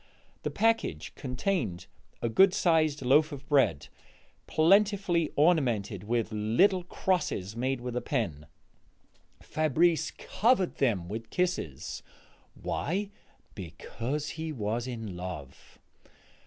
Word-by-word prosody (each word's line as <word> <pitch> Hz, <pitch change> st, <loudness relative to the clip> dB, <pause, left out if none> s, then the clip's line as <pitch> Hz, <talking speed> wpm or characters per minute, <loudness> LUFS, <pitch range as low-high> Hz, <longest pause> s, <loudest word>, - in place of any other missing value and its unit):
The -, -, -2 dB
package 225 Hz, -, 0 dB
contained 125 Hz, -, -2 dB, 0.4 s
a -, -, +2 dB
good 190 Hz, -, +5 dB
sized 160 Hz, -7 st, +2 dB
loaf 150 Hz, +5 st, +4 dB
of 140 Hz, -1 st, -8 dB
bread, 135 Hz, -, +2 dB, 0.6 s
plentifully 190 Hz, -1 st, +3 dB
ornamented 120 Hz, -, +2 dB
with, 115 Hz, 0 st, 0 dB
little 120 Hz, -, +3 dB
crosses 170 Hz, -, -1 dB
made 130 Hz, +1 st, -1 dB
with 125 Hz, -1 st, -5 dB
a 125 Hz, -, 0 dB
pen. 90 Hz, -, -2 dB, 1.0 s
Fabrice 155 Hz, +2 st, +2 dB
covered 215 Hz, -4 st, +1 dB
them 105 Hz, -11 st, +1 dB
with 110 Hz, +4 st, -6 dB
kisses. 175 Hz, -, -2 dB, 0.6 s
Why? 195 Hz, +6 st, -2 dB, 0.4 s
Because 120 Hz, -, -5 dB
he 160 Hz, 0 st, -4 dB
was 115 Hz, -1 st, -2 dB
in 115 Hz, -6 st, -5 dB
love. 90 Hz, -7 st, -8 dB
135 Hz, 105 wpm, -29 LUFS, 110-175 Hz, 1.0 s, good